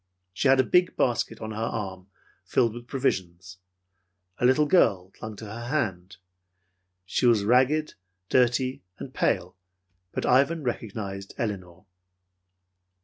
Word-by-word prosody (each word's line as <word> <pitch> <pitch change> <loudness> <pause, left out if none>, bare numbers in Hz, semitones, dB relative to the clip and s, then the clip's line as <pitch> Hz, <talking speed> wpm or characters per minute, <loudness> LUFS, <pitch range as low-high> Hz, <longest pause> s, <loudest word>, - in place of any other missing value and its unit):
She 135 - 0
had 135 0 +5
a - - +6
big 180 +7 +2
basket 115 -2 0
on 110 0 -5
her 110 - -6
arm, 95 -5 -4 0.4
filled 115 -2 +1
with 120 0 -10
provisions. 95 -9 -2 0.8
A - - +2
little 130 +4 +4
girl 100 - +3
clung 110 +1 -8
to 110 - -9
her 105 - -8
other 120 +2 -7
hand. 95 - -2 0.9
She 110 +6 +1
was 115 -4 +4
ragged, 130 +7 +3 0.3
dirty 130 +1 +2 0.2
and - - -8
pale; - - 0 0.6
but - - -3
Ivan 140 +5 +3
recognized 100 -5 -5
Elinor. 95 -7 -4
115 Hz, 135 wpm, -26 LUFS, 95-130 Hz, 0.9 s, a